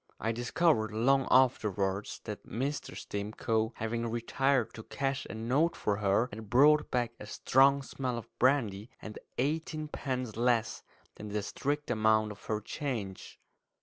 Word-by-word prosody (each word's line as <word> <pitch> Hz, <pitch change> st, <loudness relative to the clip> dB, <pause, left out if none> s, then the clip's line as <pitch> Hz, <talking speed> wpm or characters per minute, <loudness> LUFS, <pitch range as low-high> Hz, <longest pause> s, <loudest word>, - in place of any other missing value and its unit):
I 115 Hz, -, 0 dB
discovered 120 Hz, 0 st, +1 dB
long 135 Hz, +5 st, +2 dB
afterwards 105 Hz, -6 st, +2 dB
that 105 Hz, -2 st, -7 dB
Mr. 135 Hz, +6 st, -3 dB
Stimcoe, 110 Hz, +2 st, -2 dB
having 115 Hz, +1 st, -2 dB
retired 120 Hz, +2 st, +1 dB
to 115 Hz, -, -8 dB
cash 135 Hz, +3 st, -3 dB
a -, -, -6 dB
note 130 Hz, +9 st, +1 dB
for 100 Hz, -1 st, -1 dB
her, 100 Hz, +3 st, +2 dB
had 110 Hz, -1 st, -8 dB
brought 145 Hz, +5 st, +5 dB
back 120 Hz, -2 st, 0 dB
a 105 Hz, -, -9 dB
strong 135 Hz, +5 st, +3 dB
smell 130 Hz, -2 st, -3 dB
of 115 Hz, -, -7 dB
brandy 115 Hz, -5 st, +2 dB
and 110 Hz, -, -8 dB, 0.2 s
eighteen 155 Hz, +3 st, -1 dB
pence 130 Hz, -6 st, -3 dB
less 115 Hz, -1 st, +1 dB, 0.4 s
than 105 Hz, -, -7 dB
the 105 Hz, 0 st, -2 dB
strict 145 Hz, +6 st, -2 dB
amount 110 Hz, -1 st, +3 dB
of 105 Hz, -, -12 dB
her 110 Hz, -1 st, -1 dB
change. 110 Hz, -7 st, -5 dB
115 Hz, 150 wpm, -31 LUFS, 110-135 Hz, 0.4 s, brought